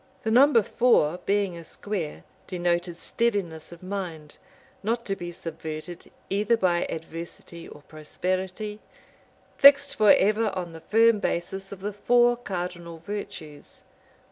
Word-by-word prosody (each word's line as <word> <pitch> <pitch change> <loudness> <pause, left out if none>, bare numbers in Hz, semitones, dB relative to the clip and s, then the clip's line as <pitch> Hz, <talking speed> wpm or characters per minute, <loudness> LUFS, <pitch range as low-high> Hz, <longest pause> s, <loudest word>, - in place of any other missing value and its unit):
The 220 - -1
number 250 -1 +6
four, 180 -9 +2
being 200 -3 +1
a 170 - -9
square, 175 -2 -5 0.2
denoted 175 -1 -1
steadiness 195 -9 -1
of 170 +1 -12
mind, 180 -6 -6 0.4
not 230 +3 -1
to 195 - -1
be 175 -2 -6
subverted 160 0 -7 0.2
either 210 +4 +1
by 175 -4 +1
adversity 165 +1 -8
or 150 - -13
prosperity, 185 +7 -4 0.8
fixed 280 0 +7
forever 215 0 +4
on 175 -3 -4
the 160 - -10
firm 225 +4 +4
basis 190 +1 -3
of 195 -1 -9
the 205 +1 -3
four 240 +4 +3
cardinal 175 -6 -5
virtues. 165 -4 -8
185 Hz, 125 wpm, -26 LUFS, 170-215 Hz, 0.8 s, fixed